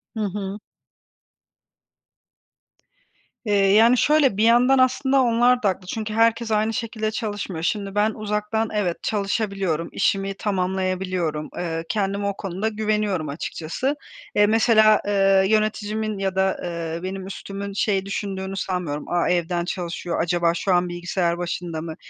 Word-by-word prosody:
Hı - - -4
hı. 200 0 -4 2.9
Eee, 210 - 0 0.2
yani 230 +4 +6
şöyle 285 -6 +3
bir 215 - +2
yandan 245 +4 +5
aslında 265 +1 +3
onlar 245 0 +3
da 200 - +4
haklı, 185 -1 -5
çünkü 215 +2 -4
herkes 230 0 +2
aynı 215 +1 +1
şekilde 220 -1 -3
çalışmıyor. 205 -6 -4
Şimdi 200 +2 -2
ben, 210 +1 +3
uzaktan 210 +1 -2
evet, 190 -5 -1
çalışabiliyorum, 195 -5 -1
işimi 195 -1 0
tamamlayabiliyorum, 185 -5 -2
eee, 165 -2 -3
kendime 200 -1 -1
o 200 - -3
konuda 195 +2 -3
güveniyorum 210 -6 -1
açıkçası. 170 - -3 0.4
Eee, 210 - +5
mesela, 215 -1 +5
eee, 195 -1 +4
yöneticimin 215 0 0
ya 190 -1 -1
da, 190 0 +1
eee, 170 -1 -4
benim 190 0 -5
üstümün 200 +1 -6
şey 195 -1 0
düşündüğünü 195 -1 -4
sanmıyorum, 180 -6 -3
"A, 175 0 +1
evden 175 0 0
çalışıyor, 175 -1 -3
acaba 170 0 +1
şu 185 +2 0
an 180 0 +2
bilgisayar 175 0 -1
başında 175 -2 -4
mı, 160 -1 -6
195 Hz, 135 wpm, -23 LUFS, 180-215 Hz, 2.9 s, yani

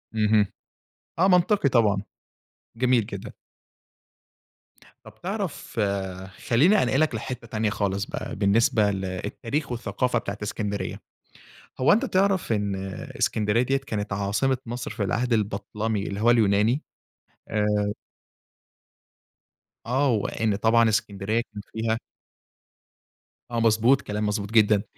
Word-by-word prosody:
اهم، 105 -1 +4 0.7
آه 185 +3 +4
منطقي 180 -2 +4
طبعًا، 105 -6 +3 0.8
جميل 125 -2 +3
جدًا. 100 -3 -7 1.7
طَب - - -13
تعرف 190 - -4 0.7
خلِّيني 165 - +5
أنقلك 135 +2 +1
لحتة 120 +2 -5
تانية 110 -1 -1
خالص 100 -1 -1
بقى، - - -5
بالنسبة 105 +1 +3
ل 95 -1 -3
التاريخ 115 - -3
والثقافة 120 +1 -1
بتاعة 100 -3 -5
إسكندرية. 105 -1 -3 0.8
هو 130 - +5
أنت 220 - +3
تعرف 190 -7 +1
إن 100 -2 0 0.4
إسكندرية 105 +2 +2
دِيَّة 135 +2 +1
كانت 110 -7 -4
عاصمة 105 +7 0
مصر 120 +1 -5
في 110 0 -4
العهد 120 +5 0
البَطلَمي 110 0 -1
اللي 100 0 -4
هو 115 +2 +4
اليوناني؟ 110 +4 +3 0.7
آآ 105 -1 +1 1.9
آه، 135 +4 +2
وإن 110 -1 0
طبعًا 115 +2 +4
إسكندرية 105 +1 0
كان 105 - -6
فيها 110 0 0 1.5
آه، 120 - 0
مضبوط، 115 +4 +4
كلام 105 +1 -3
مضبوط 105 0 -2
جدًا. 105 -2 +4
110 Hz, 115 wpm, -25 LUFS, 105-125 Hz, 1.9 s, خلِّيني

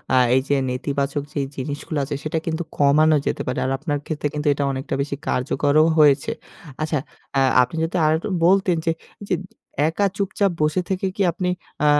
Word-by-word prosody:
আ - - +5 0.2
এই 130 - +4
যে 145 - +4
নেতিবাচক 140 +2 -2
যেই 140 -2 -1
জিনিসগুলা 145 +3 -3
আছে 145 +1 -4
সেটা 160 +1 -2
কিন্তু 165 +1 -1
কমানো 150 +2 +5
যেতে - - -1
পারে। 125 - -1
আর 130 - 0
আপনার 145 +1 -2
ক্ষেত্রে 150 -2 -2
কিন্তু 150 0 -2
এটা 140 - -2
অনেকটা 135 +1 -3
বেশি 140 0 -2
কার্যকরও 145 +4 +2
হয়েছে। 150 +7 +4 0.5
আচ্ছা, 155 0 0 0.4
আ - - +5 0.2
আপনি 125 - -5
যদি 165 - -2
আরেকটু 160 +5 +1 0.2
বলতেন 190 -1 +4
যে 165 - +3 0.3
এইযে 200 -2 -1 0.5
একা 185 +5 +1
চুপচাপ 200 -1 +1
বসে 155 +4 +2
থেকে 190 0 -1
কি - - -2
আপনি, 180 +2 -2 0.3
আ - - +4
150 Hz, 180 wpm, -22 LUFS, 140-165 Hz, 0.5 s, আ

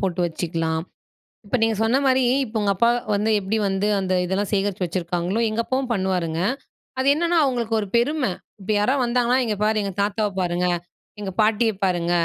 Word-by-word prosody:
போட்டு 185 -2 -1
வச்சுக்கலாம். 160 -1 -2 0.6
இப்ப 250 - 0
நீங்க 225 0 +2
சொன்ன 245 +5 +3
மாரி 260 -1 +3 0.2
இப்ப 220 0 -13
உங்க 200 -1 +2
அப்பா 235 +5 +3 0.2
வந்து 210 +2 +1
எப்டி 200 +3 -1
வந்து 195 +2 0
அந்த 185 -1 -1
இதெல்லாம் 190 +2 -1
சேகரிச்சு 195 -1 0
வச்சுருக்காங்களோ, 175 +3 -2
எங்க 215 +2 -1
அப்பாவும் 260 -1 -1
பண்ணுவாருங்க. 180 -5 -1 0.6
அது 265 - +1
என்னன்னா 340 +2 +1
அவுங்களுக்கு 240 -5 0
ஒரு 205 - -4
பெருமை. 255 -2 +1 0.3
இப்ப 195 +3 -3
யாராவது 255 +5 +2
வந்தாங்கன்னா, 245 +1 +2
இங்கே 210 -2 -2
பாரு 215 0 +2
எங்க 195 - -3
தாத்தாவ 210 +1 0
பாருங்க, 175 0 0 0.5
எங்க 195 -2 -4
பாட்டிய 220 +1 +3
பாருங்க, 175 -2 0
205 Hz, 170 wpm, -23 LUFS, 185-235 Hz, 0.6 s, சொன்ன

